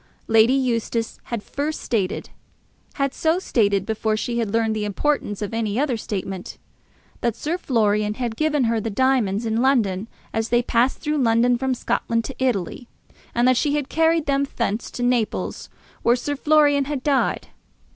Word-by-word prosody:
Lady 225 +2 +5
Eustace 230 -3 -1
had 235 -4 -4
first 295 +2 -3
stated, 205 -6 -2 0.6
had 275 -1 0
so 320 +2 +1
stated 205 - +1
before 220 0 -1
she 235 +2 -2
had 220 -3 -1
learned 225 0 +1
the 215 - -2
importance 210 -1 -1
of 205 - -5
any 220 -2 -1
other 280 -4 +1
statement, 195 -4 -5 0.6
that 235 -2 0
Sir 310 +7 -2
Florian 210 - +1
had 240 -2 -3
given 300 0 +1
her 230 -1 +1
the 225 - -3
diamonds 230 -2 +1
in 225 +1 0
London, 225 -7 +2 0.3
as 225 0 -1
they 240 +1 +3
passed 240 +2 +2
through 300 -1 -1
London 240 0 +3
from 260 +1 -1
Scotland 230 -1 -1
to 270 - -6
Italy, 240 -1 -1 0.5
and 240 +1 +3
that 255 -1 +4
she 295 +1 +1
had 290 -2 -2
carried 325 -1 +2
them 280 0 +1
thence 225 -2 -1
to 245 - -5
Naples, 245 -3 -1 0.3
where 235 - +4
Sir 290 +4 -3
Florian 290 -1 +3
had 280 -2 -4
died. 280 -2 +1
240 Hz, 170 wpm, -22 LUFS, 220-275 Hz, 0.6 s, Lady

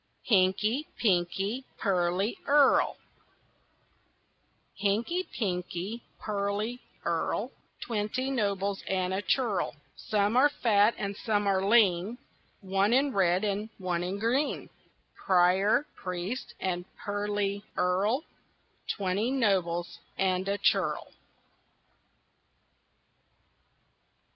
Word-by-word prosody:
HINKY, 210 +7 +2
PINKY, 195 +4 0
PEARLY 185 +1 0
EARL 285 -1 +4 1.8
Hinky, 235 - 0
pinky, 190 +1 -3 0.2
pearly 210 +3 -2 0.3
earl, - - -1 0.3
Twenty 235 +4 -2
nobles 200 -5 -1
and 185 -1 0
a 190 - -1
churl; 205 - 0 0.2
Some 210 +1 0
are 275 +4 +6
fat 220 -5 +3
and 200 0 -3
some 205 -1 0
are 190 -1 +2
lean, 200 0 +3 0.4
One 195 +3 +1
in 270 +1 +3
red 185 -1 +2
and 210 +1 -1
one 180 -3 -2
in 180 +3 -3
green 245 +8 0 0.4
Prior, 190 +7 +3
priest, 185 +7 -5
and 180 -1 -2
pearly 205 0 -2
earl, 200 +10 +1 0.6
Twenty 200 +3 0
nobles 185 -9 0 0.2
and 185 0 +1
a 200 - 0
churl. 200 - +1
200 Hz, 90 wpm, -29 LUFS, 185-225 Hz, 1.8 s, are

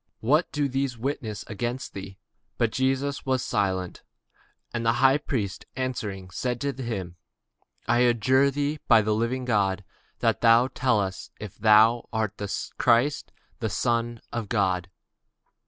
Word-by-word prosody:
what 150 +9 +3
is - - -46
it - - 0
which 140 - 0
these 135 -2 -1
witness 115 -4 -4
against 120 +4 -4
thee? 95 0 -8 0.4
But 115 -2 +1
Jesus 135 +2 0
held 130 -1 +1
his 130 - -3
peace. 95 -3 -1 0.7
And 120 -1 -2
the 115 0 +3
high 135 +4 +4
priest 110 -10 -3
answered 125 -6 -3
and 95 -1 -12
said 125 +6 -3
unto 140 -1 -3
him, 95 -8 -4 0.7
I 120 - +3
adjure 125 +3 +4
thee 145 +2 -2
by 115 -3 +6
the 105 +1 +1
living 115 +4 -1
God, 100 -4 +1 0.3
that - - +1
thou 115 +2 +5
tell 125 -5 +1
us 95 -1 -4
whether 105 -3 -8
thou 110 +2 +5
be 110 -2 0
the 100 -1 -4
Christ, 125 +5 +2 0.3
the 110 - -1
Son 120 +1 -1
of 115 -4 -3
God. 95 -5 0
115 Hz, 160 wpm, -26 LUFS, 105-130 Hz, 0.7 s, by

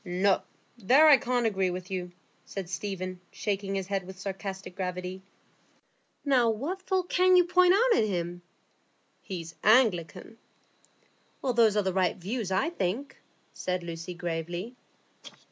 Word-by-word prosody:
"No; 190 +1 +1 0.4
there 265 +9 +6
I 295 -3 +9
can't 245 -1 0
agree 190 -4 +1
with 180 +1 -6
you," 180 -1 -4 0.3
said 195 -3 -6
Stephen, 185 0 -4
shaking 200 -1 -3
his 195 -1 -2
head 195 -1 -3
with 190 0 -9
sarcastic 195 -1 -6
gravity. 180 0 -4 1.0
"Now, 255 -5 +4
what 290 - -3
fault 370 -1 -1
can 370 0 +4
you 360 - +7
point 360 +1 +5
out 475 +3 +4
in 215 - +1
him?" 175 -2 -3 0.8
"He's 170 -4 -6
an 165 - -30
Anglican." 215 -2 +2 1.0
"Well, 255 - +1
those 225 -3 +4
are 210 - +3
the 190 -1 -1
right 185 -2 +1
views, 200 +2 -4
I 190 - +1
think," 245 - -3 0.4
said 180 -1 -3
Lucy, 170 +1 -6
gravely. 175 +6 -4
195 Hz, 145 wpm, -28 LUFS, 180-245 Hz, 1.0 s, I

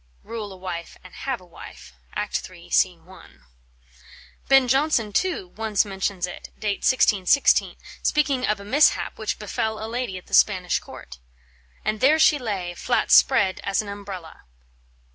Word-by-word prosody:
Rule 220 -3 -6
a 190 - -11
Wife 180 -2 -7
and 185 - -14
Have 265 -4 -4
a 180 - -17
Wife, 165 - -13 0.2
Act - - -3
iii, - - -15
sc. - - +5 0.2
I. - - -15 1.2
Ben 270 -1 +5
Jonson, 260 -5 +1
too, 345 - -1
once 215 +1 0
mentions 190 -2 -2
it 180 - -9
(date 205 -2 -2
1616), 235 0 +3 0.2
speaking 285 -4 +1
of 210 -4 0
a 200 - -10
mishap 280 +4 +2
which 220 - -2
befel 220 +1 -3
a 220 - -5
lady 235 -4 -4
at 180 - -12
the - - -17
Spanish 185 -4 +3
Court: - - -12 0.7
"And 215 0 -1
there 290 +4 +5
she 305 -2 +4
lay, 195 -7 -4
flat - - -1
spread 185 - +4
as 200 +1 0
an 205 - -9
umbrella." 195 - -9
210 Hz, 160 wpm, -23 LUFS, 185-250 Hz, 1.2 s, sc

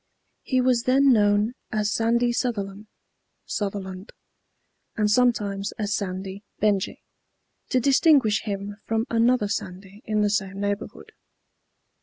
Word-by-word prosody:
He 255 -1 +1
was 250 -2 +2
then 270 +1 +5
known 205 +1 +3 0.2
as 215 0 0
Sandy 235 +1 +2
Suthelan 210 -4 -3 0.6
(Sutherland), 195 -1 -5 0.8
and 210 -1 +2
sometimes 210 -4 +1
as 205 -1 -3
Sandy 190 +1 -5 0.2
Benjy, 205 -1 0 0.7
to 255 - +2
distinguish 265 -4 +4
him 205 -1 -5
from 225 0 -1
another 230 -1 +3
Sandy 195 +1 -6
in 215 -1 0
the 205 - +2
same 195 -2 -2
neighborhood. 205 0 -4
210 Hz, 115 wpm, -24 LUFS, 200-235 Hz, 0.8 s, then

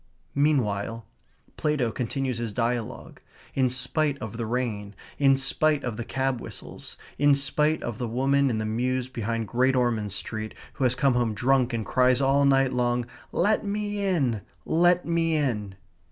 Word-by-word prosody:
Meanwhile, 115 -7 0 0.5
Plato 145 -7 0
continues 125 +1 -2
his 115 -2 -3
dialogue; 120 0 -3 0.3
in 130 -2 +2
spite 140 +3 0
of 110 -4 -7
the 115 -1 -3
rain; 110 -4 -3 0.2
in 135 -1 +5
spite 150 +2 +1
of 120 -3 -3
the 120 - -4
cab 130 0 -1
whistles; - - -9 0.2
in 145 0 +5
spite 150 +3 +1
of 120 -2 -4
the 120 - -2
woman 135 +4 +2
in 115 - -1
the 110 - -2
mews 125 +3 -1
behind 115 -2 -3
Great 130 +3 +2
Ormond 115 -5 0
Street 110 +3 -4 0.2
who 135 - -1
has 125 0 +2
come 135 0 +3
home 120 -3 0
drunk 130 +1 +2
and 115 -2 -2
cries 125 0 +3
all 140 +1 +3
night 135 -1 +3
long, 120 -1 +1 0.3
"Let 210 +5 +2
me 205 0 -2
in! 140 - +1 0.2
Let 175 +2 +3
me 165 -1 +1
in!" 105 -10 -1
130 Hz, 165 wpm, -26 LUFS, 115-140 Hz, 0.5 s, in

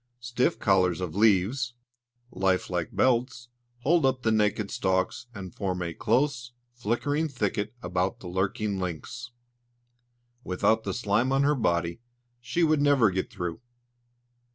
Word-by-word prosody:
Stiff 120 +1 0
collars 95 -4 +2
of 90 -4 -4
leaves, 110 +5 +2 0.6
like 95 0 0
life 90 -2 -1
belts, 120 -1 +1 0.3
hold 165 +5 +3
up 130 -1 +1
the 110 - +2
naked 105 -1 +1
stalks, 95 +5 -1
and 95 -4 -7
form 90 -2 -2
a 85 -1 -4
close, 125 - 0 0.2
flickering 125 +7 -1
thicket 105 -5 -2
about 90 +1 -1
the 90 - -9
lurking 95 +2 -1
lynx. 95 +8 -5 1.1
Without 110 +4 +1
the - - -2
slime 120 +2 +1
on 135 +1 +3
her 145 +1 +3
body, 85 - 0 0.4
she 125 +8 -1
would 155 -2 +3
never 140 -8 +4
get 95 0 -2
through. 90 +2 -5
110 Hz, 135 wpm, -27 LUFS, 95-125 Hz, 1.1 s, never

